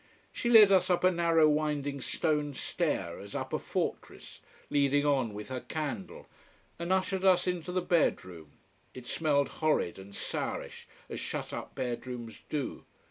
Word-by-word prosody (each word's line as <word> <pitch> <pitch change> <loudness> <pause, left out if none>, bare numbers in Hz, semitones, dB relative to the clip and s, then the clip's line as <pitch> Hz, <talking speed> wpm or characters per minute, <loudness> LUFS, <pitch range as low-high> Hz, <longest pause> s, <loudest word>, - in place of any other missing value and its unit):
She 240 - -1
led 215 -4 +9
us 190 -1 +4
up 180 -1 +2
a 185 - +6
narrow 165 -2 +4
winding 150 -2 0
stone 150 -1 -1
stair, 130 - -2
as 100 0 -9
up - - -4
a - - +1
fortress, - - -4 0.3
leading 145 0 +3
on 135 -6 +2
with 105 +2 -8
her 130 -1 -3
candle, 150 - -5 0.5
and 170 +2 -3
ushered 190 0 +1
us 185 -2 +5
into 180 -1 -2
the 180 0 0
bedroom. 90 - 0 0.4
It 130 -1 -9
smelled 145 0 +1
horrid 155 - +1
and 100 +1 -11
sourish, - - -4 0.2
as - - -6
shutup - - -5
bedrooms 120 -3 -5
do. 145 -4 -3
145 Hz, 150 wpm, -30 LUFS, 125-170 Hz, 0.5 s, led